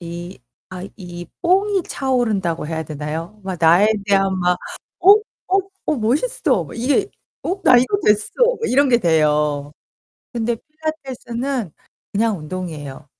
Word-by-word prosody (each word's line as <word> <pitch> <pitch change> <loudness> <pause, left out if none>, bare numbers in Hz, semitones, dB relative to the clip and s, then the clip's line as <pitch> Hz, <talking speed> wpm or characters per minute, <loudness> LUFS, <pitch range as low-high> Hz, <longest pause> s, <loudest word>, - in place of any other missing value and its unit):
이 175 +1 -7 0.3
아 185 -1 -7
이 175 -3 -8 0.2
뽕이 385 +1 +2
차오른다고 215 - 0
해야 160 0 -3
되나요? 155 +6 -5
막 190 -1 -3
나에 170 +5 +6 0.2
대한 195 -1 +2
막 180 0 +2 0.4
"어, 385 +2 +8 0.3
어, 385 +1 +3 0.3
어, 305 - +2
멋있어!" 275 - +1
이게 280 - +1 0.3
어 385 +2 -2
"나 250 - +7
이거 255 +11 +3
됐어." 210 0 +3 0.3
막 460 - -1
이런 275 +2 +4
게 240 - +5
돼요. 150 -5 +2 0.6
근데 235 -1 -1
필라테스는 265 - -4 0.4
그냥 215 -2 +1
운동이에요. 155 -5 -6
205 Hz, 250 characters per minute, -20 LUFS, 170-265 Hz, 0.6 s, 어